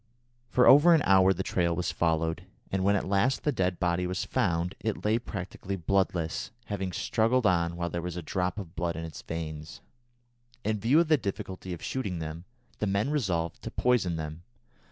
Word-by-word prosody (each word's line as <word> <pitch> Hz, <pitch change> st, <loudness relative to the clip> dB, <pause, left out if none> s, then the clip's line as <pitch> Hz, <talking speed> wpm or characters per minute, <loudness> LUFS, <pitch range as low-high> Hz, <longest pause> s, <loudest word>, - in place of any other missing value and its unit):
For 125 Hz, -, +4 dB
over 155 Hz, +5 st, +8 dB
an 155 Hz, -, +2 dB
hour 95 Hz, -1 st, +5 dB
the 95 Hz, 0 st, -1 dB
trail 85 Hz, -3 st, 0 dB
was 90 Hz, -, -1 dB
followed, 80 Hz, +2 st, 0 dB, 0.2 s
and 95 Hz, -1 st, 0 dB
when 100 Hz, +1 st, +4 dB
at 100 Hz, -, -1 dB
last 100 Hz, +7 st, +1 dB
the 150 Hz, -, +2 dB
dead 90 Hz, -7 st, -1 dB
body 90 Hz, 0 st, +1 dB
was 90 Hz, +1 st, -2 dB
found, 90 Hz, -7 st, 0 dB
it 110 Hz, -1 st, -3 dB
lay 110 Hz, +2 st, +3 dB
practically 100 Hz, -3 st, -5 dB
bloodless, 90 Hz, -2 st, 0 dB, 0.2 s
having 95 Hz, -3 st, -3 dB
struggled 115 Hz, +6 st, +1 dB
on 85 Hz, -3 st, +2 dB
while 85 Hz, 0 st, -3 dB
there 85 Hz, -, -2 dB
was 90 Hz, 0 st, -5 dB
a 90 Hz, -, -5 dB
drop 90 Hz, +4 st, -2 dB
of 90 Hz, -4 st, -7 dB
blood 85 Hz, 0 st, -1 dB
in 80 Hz, +1 st, -4 dB
its 80 Hz, -2 st, -8 dB
veins. 80 Hz, 0 st, -6 dB, 0.8 s
In 110 Hz, 0 st, 0 dB
view 125 Hz, +9 st, +4 dB
of 170 Hz, -, 0 dB
the 155 Hz, -1 st, +5 dB
difficulty 95 Hz, -4 st, -5 dB
of 85 Hz, -, -6 dB
shooting 100 Hz, -9 st, -3 dB
them, 80 Hz, +2 st, -6 dB, 0.3 s
the 105 Hz, -, 0 dB
men 100 Hz, +7 st, 0 dB
resolved 90 Hz, -, -1 dB
to -, -, -5 dB
poison 115 Hz, -9 st, +1 dB
them. 80 Hz, 0 st, -5 dB
95 Hz, 195 wpm, -28 LUFS, 85-105 Hz, 0.8 s, over